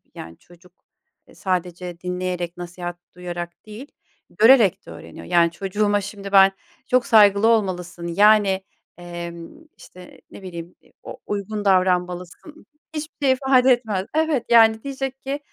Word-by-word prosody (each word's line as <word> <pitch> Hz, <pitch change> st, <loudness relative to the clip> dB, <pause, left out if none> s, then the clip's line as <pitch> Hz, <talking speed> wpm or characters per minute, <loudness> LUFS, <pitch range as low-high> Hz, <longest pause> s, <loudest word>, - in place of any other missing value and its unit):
yani 85 Hz, 0 st, -10 dB
çocuk, 175 Hz, +1 st, -21 dB, 0.6 s
eee, -, -, -19 dB
sadece 180 Hz, -1 st, -4 dB
dinleyerek 180 Hz, -1 st, -4 dB
nasihat 175 Hz, 0 st, -7 dB, 0.2 s
duyarak 175 Hz, 0 st, -7 dB
değil, 215 Hz, +6 st, -10 dB, 0.4 s
görerek 225 Hz, -3 st, +4 dB
de -, -, -11 dB
öğreniyor. 85 Hz, 0 st, -11 dB
Yani 170 Hz, -, +2 dB
çocuğuma 205 Hz, +3 st, -1 dB
şimdi 200 Hz, 0 st, -8 dB
ben 195 Hz, -1 st, +6 dB, 0.4 s
çok 255 Hz, -1 st, +2 dB
saygılı 210 Hz, -1 st, +5 dB
olmalısın, 180 Hz, -6 st, -1 dB
yani, 200 Hz, +1 st, +3 dB, 0.3 s
emm, 175 Hz, -, -9 dB
işte, 180 Hz, 0 st, -15 dB
ne -, -, -12 dB
bileyim 170 Hz, -1 st, -9 dB
e -, -, -26 dB
o -, -, -9 dB
uygun 205 Hz, +1 st, -4 dB
davranmalısın, 180 Hz, -, -1 dB, 0.3 s
hiçbir 305 Hz, -1 st, -5 dB
şey 265 Hz, -, +4 dB
ifade 260 Hz, -1 st, +3 dB
etmez 220 Hz, -6 st, 0 dB
Evet, 315 Hz, -5 st, 0 dB
yani 225 Hz, -1 st, +5 dB
diyecek 270 Hz, -1 st, -5 dB
ki 275 Hz, +2 st, -4 dB
195 Hz, 135 wpm, -21 LUFS, 175-225 Hz, 0.6 s, ben